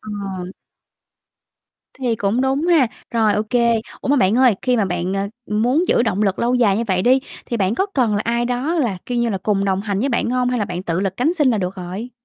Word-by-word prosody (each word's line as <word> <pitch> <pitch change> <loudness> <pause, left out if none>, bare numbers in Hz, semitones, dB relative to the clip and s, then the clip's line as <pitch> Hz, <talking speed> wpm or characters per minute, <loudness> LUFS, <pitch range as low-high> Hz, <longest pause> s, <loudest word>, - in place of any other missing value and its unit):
Ờ. 200 -3 -6 1.5
Thì 245 -3 0
cũng 205 +4 0
đúng 270 +4 0
ha. 325 -8 +4 0.2
Rồi, 225 -3 +2
OK. 210 +1 -2 0.5
Ủa, - - -5
mà 285 - +4
bạn 195 -2 +3
ơi, 250 -5 +5
khi 250 -1 +2
mà 215 - +2
bạn, 180 +1 -2
à, 195 +1 -1 0.2
muốn 245 +11 +1
giữ - - +3
động 215 -3 0
lực 195 -2 0
lâu 245 +2 +1
dài 215 -6 +3
như 230 - -1
vậy 185 -2 +1
đi 260 +2 +4 0.3
thì 235 - -2
bạn 195 -1 +1
có 385 +11 0
cần 235 -6 +2
là 205 - 0
ai 235 +1 0
đó 250 +7 -1
là, 225 - 0
kiểu 245 -1 -2
như 235 - +1
là, 195 - -2
cùng 200 -1 +1
đồng 190 -1 0
hành 200 -1 -2
với 275 - 0
bạn 235 -2 0
hông? 250 0 +1
Hay 250 - 0
là 210 - 0
bạn 180 -1 -5
tự 170 0 -2
lực 195 -1 -2
cánh 295 +8 +1
sinh 295 -6 +3
là 220 - +1
được 185 -1 -3
rồi? 190 +6 -6
220 Hz, 250 wpm, -20 LUFS, 195-250 Hz, 1.5 s, ơi